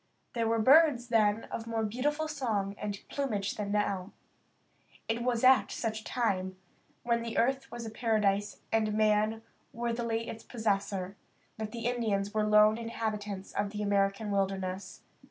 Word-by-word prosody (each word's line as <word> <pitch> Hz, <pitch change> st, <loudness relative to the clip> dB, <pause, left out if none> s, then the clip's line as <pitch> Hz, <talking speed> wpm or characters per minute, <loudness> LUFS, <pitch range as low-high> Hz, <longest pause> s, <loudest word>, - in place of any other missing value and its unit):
There 230 Hz, -2 st, 0 dB
were 230 Hz, 0 st, +2 dB
birds 260 Hz, 0 st, +5 dB
then 220 Hz, -1 st, +3 dB
of 225 Hz, -, -5 dB
more 225 Hz, -1 st, -1 dB
beautiful 290 Hz, +8 st, -1 dB
song 225 Hz, -10 st, -1 dB
and 205 Hz, -1 st, -4 dB
plumage 215 Hz, -8 st, -2 dB
than 205 Hz, -1 st, -4 dB
now. 200 Hz, -2 st, -1 dB, 0.9 s
It 225 Hz, +1 st, -1 dB
was 240 Hz, -1 st, 0 dB
at 260 Hz, 0 st, +6 dB
such 220 Hz, -1 st, -3 dB
a -, -, -18 dB
time, 190 Hz, -7 st, -1 dB, 0.5 s
when 235 Hz, -1 st, -1 dB
earth 270 Hz, +3 st, +1 dB
was 240 Hz, -1 st, -6 dB
a 220 Hz, -, -6 dB
paradise 205 Hz, -3 st, 0 dB
and 215 Hz, -1 st, +1 dB
man 215 Hz, +1 st, +2 dB, 0.3 s
worthily 230 Hz, -1 st, -2 dB
its 225 Hz, -, -7 dB
possessor, 200 Hz, -4 st, -2 dB, 0.4 s
that 215 Hz, -1 st, -4 dB
the 230 Hz, -1 st, -6 dB
Indians 215 Hz, -5 st, 0 dB
were 215 Hz, -1 st, +1 dB
lone 210 Hz, +1 st, +5 dB
inhabitants 210 Hz, -4 st, -4 dB
of 205 Hz, 0 st, -1 dB
the 210 Hz, 0 st, -4 dB
American 200 Hz, +1 st, +1 dB
wilderness. 190 Hz, -1 st, -2 dB
220 Hz, 150 wpm, -30 LUFS, 205-235 Hz, 0.9 s, at